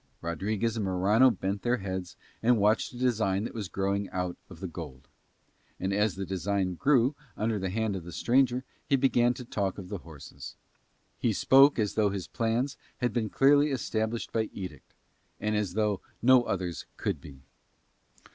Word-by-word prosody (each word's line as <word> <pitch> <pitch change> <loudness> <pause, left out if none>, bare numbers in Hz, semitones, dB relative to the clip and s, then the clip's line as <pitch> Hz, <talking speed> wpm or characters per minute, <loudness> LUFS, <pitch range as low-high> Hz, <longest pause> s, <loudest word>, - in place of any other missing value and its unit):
Rodriguez 105 +7 -1
and 110 - -1
Morano 100 +7 +4
bent 100 -2 -2
their 125 +1 +1
heads 95 -3 -5 0.2
and 120 +1 +4
watched 105 +1 +2
a 120 - -10
design 110 -6 +1
that - - -5
was 110 -4 -4
growing 100 +3 -1
out 90 -1 -2
of 90 - -12
the 95 - -4
gold. 75 -6 -9 0.7
And 95 +1 -1
as 105 -1 +1
the 95 +1 -4
design 95 0 -1
grew 135 - +3 0.2
under 110 0 0
the 95 0 -2
hand 110 +1 -1
of 90 - -5
the 90 - -9
strange 125 +7 +3
worker 125 +1 -4 0.2
he 140 - +4
began 125 -2 +3
to 125 - -8
talk 100 -5 -2
of 95 -3 -8
the 100 -2 -4
horses. 70 -4 -10 0.6
He 115 - +1
spoke 135 +7 +6
as 105 -3 0
though 105 -2 +2
his 95 -2 -4
plans 115 +4 -1 0.2
had 125 -3 -1
been 110 -2 0
clearly 145 +4 +5
established 115 -4 -2
by 110 -1 0
edict, 90 -8 -8 0.4
and 105 0 -1
as 100 -4 -1
though 105 -3 +1 0.2
no 125 0 +5
others 90 -5 -3
could - - -2
be. 70 -1 -13
105 Hz, 180 wpm, -29 LUFS, 95-120 Hz, 0.7 s, spoke